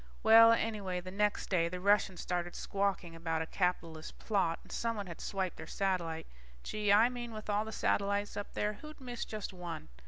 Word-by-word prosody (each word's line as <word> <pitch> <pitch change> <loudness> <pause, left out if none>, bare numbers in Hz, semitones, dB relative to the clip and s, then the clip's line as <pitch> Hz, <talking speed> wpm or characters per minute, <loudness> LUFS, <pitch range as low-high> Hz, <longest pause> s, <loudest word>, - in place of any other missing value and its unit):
Well, 230 +1 +9
anyway 210 -5 0
the 185 +1 -8
next 210 +1 0
day, 170 -3 +3
the 180 +1 -5
Russians 200 -2 +2
started 175 -1 -2
squawking 195 -4 -1
about 165 -1 -1
a - - -5
capitalist 165 -3 -2
plot, 190 -6 +1
and - - -15
someone 230 -3 -2
had 170 -3 -8
swiped 190 -2 -2
their 160 - -8
satellite. 175 -5 -1 0.4
Gee, 210 -1 0
I 215 +3 +7
mean 240 -2 -5
with 215 -1 -4
all 205 +1 +1
the 220 - -6
satellites 200 -1 0
up 205 - -5
there, 210 0 0
who'd 305 +9 -11
miss 245 -2 -5
just 215 -2 -5
one? 175 -3 -6
200 Hz, 190 wpm, -33 LUFS, 175-215 Hz, 0.4 s, Well